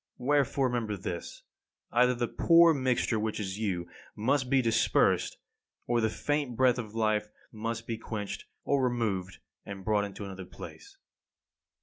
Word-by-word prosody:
Wherefore 140 +1 +2
remember 115 -5 -1
this: 90 -2 -6 0.5
either 125 +1 +4
the 120 0 -1
poor 170 +4 +6
mixture 130 -5 +1
which 110 0 -2
is 95 0 -4
you, 90 -5 -1 0.3
must 130 +4 +1
be 135 0 +4
dispersed, 115 -2 +2 0.5
or 120 -1 +1
the 110 - +2
faint 145 +1 -1
breath 125 0 +3
of 110 -2 -7
life 110 -1 +1 0.2
must 115 +1 -4
be 115 -1 -4
quenched, 105 -3 -5 0.2
or 140 -1 +2
removed 105 -7 -1 0.3
and 95 -2 -8
brought 105 -1 +2
into 100 0 -7
another 95 -1 -7
place. 390 - -11
115 Hz, 145 wpm, -30 LUFS, 105-125 Hz, 0.5 s, poor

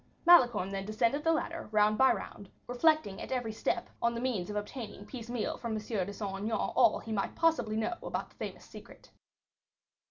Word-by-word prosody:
Malicorne 240 - +6
then 195 0 -3
descended 230 +7 0
the 330 - +3
ladder, 330 -2 -2
round 210 0 +4
by 265 +4 +5
round, 200 - -6 0.2
reflecting 250 -5 +2
at - - -7
every 245 -4 -1
step 215 - -1
on 235 0 +1
the - - -2
means 235 -7 -2
of 210 - -5
obtaining 210 -1 -6
piecemeal 235 0 -4
from 235 -2 -3
M. - - -1
de 210 -3 -3
Saint 195 -1 -5
Aignan 215 +3 -2
all 235 -4 +3
he 225 - -8
might 200 -2 -2
possibly 245 -10 +2
know 225 +10 0
about - - -4
the - - -24
famous - - -7
secret. - - -14
225 Hz, 190 wpm, -31 LUFS, 210-255 Hz, 0.2 s, Malicorne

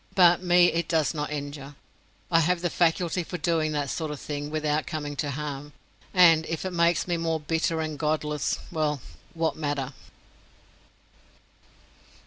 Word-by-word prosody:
But 175 -2 +6
me 175 -1 +5
it 170 +1 -1
does 160 -2 +1
not 150 -1 -3
injure, 145 -1 -6 0.6
I 165 - +5
have 170 +2 +1
the 175 -2 -1
faculty 175 +1 +1
for 180 - -5
doing 160 -1 0
that 145 -2 -1
sort 160 -2 -3
of 150 -2 -5
thing 145 0 -5
without 155 0 -1
coming 150 -2 -4
to 145 - -1
harm, 145 0 -5 0.4
and 170 -4 +6
if 165 +2 -3
it 185 - -3
makes 170 0 +2
me 175 -1 0
more 165 -1 -1
bitter 160 +1 0
and 155 -2 -4
godless, 150 -2 0
well, 155 -3 0 0.4
what 165 -1 0
matter? 145 -3 -2
155 Hz, 155 wpm, -26 LUFS, 150-170 Hz, 0.6 s, But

